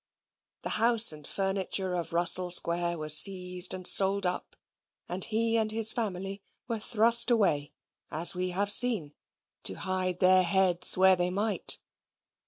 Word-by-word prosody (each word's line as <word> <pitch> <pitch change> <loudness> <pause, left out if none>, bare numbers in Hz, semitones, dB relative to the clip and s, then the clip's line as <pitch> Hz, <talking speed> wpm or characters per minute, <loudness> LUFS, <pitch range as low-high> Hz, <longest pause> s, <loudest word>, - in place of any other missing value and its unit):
The - - -6
house 230 -3 +4
and 150 -2 -13
furniture 195 -1 -4
of 175 -2 -6
Russell 175 +1 +3
Square 175 0 +1
were 155 -1 -7
seized 180 +2 +3
and 185 -1 -8
sold 195 +1 +4
up, 180 0 -6 0.5
and 180 +2 -3
he 230 +1 -3
and 220 -1 -3
his 220 0 +2
family 195 -3 -7 0.3
were 230 -3 -6
thrust 230 +2 +2
away, 170 - -2 0.4
as 165 +3 +1
we 180 0 -5
have 200 +3 -3
seen, 205 -11 +2 0.5
to 95 - -4
hide 185 - -6
their 185 0 +2
heads 185 -1 +1
where 190 0 +2
they 175 0 -3
might. 205 +3 +1
185 Hz, 150 wpm, -25 LUFS, 180-210 Hz, 0.5 s, house